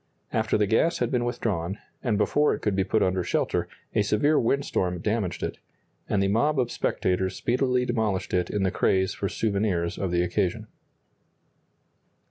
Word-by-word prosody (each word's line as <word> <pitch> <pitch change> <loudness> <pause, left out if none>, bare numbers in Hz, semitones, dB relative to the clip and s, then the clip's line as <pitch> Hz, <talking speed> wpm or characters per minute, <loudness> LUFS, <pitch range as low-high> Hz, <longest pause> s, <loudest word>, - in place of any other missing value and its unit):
After 110 -1 +1
the 105 - +3
gas 115 - +2
had 120 -1 -1
been 120 -1 +1
withdrawn, 100 -6 -2 0.3
and 115 -6 +1
before 145 +8 +2
it - - -10
could 105 -2 +1
be 95 - +2
put 105 +3 +1
under 95 0 +1
shelter, - - 0 0.3
a 110 - +3
severe 105 +9 +2
windstorm 115 -8 0
damaged 105 -1 -2
it, - - -4 0.5
and 100 -1 +2
the - - +2
mob 135 +8 +2
of 120 -2 0
spectators 95 0 0
speedily 125 0 +1
demolished 110 -6 -1
it 90 -1 +1
in 105 -2 -1
the 95 - +1
craze 95 0 +1
for 100 - -3
souvenirs 100 -5 -1
of 95 - -1
the 85 0 +2
occasion. 90 0 -1
105 Hz, 170 wpm, -26 LUFS, 95-120 Hz, 0.5 s, the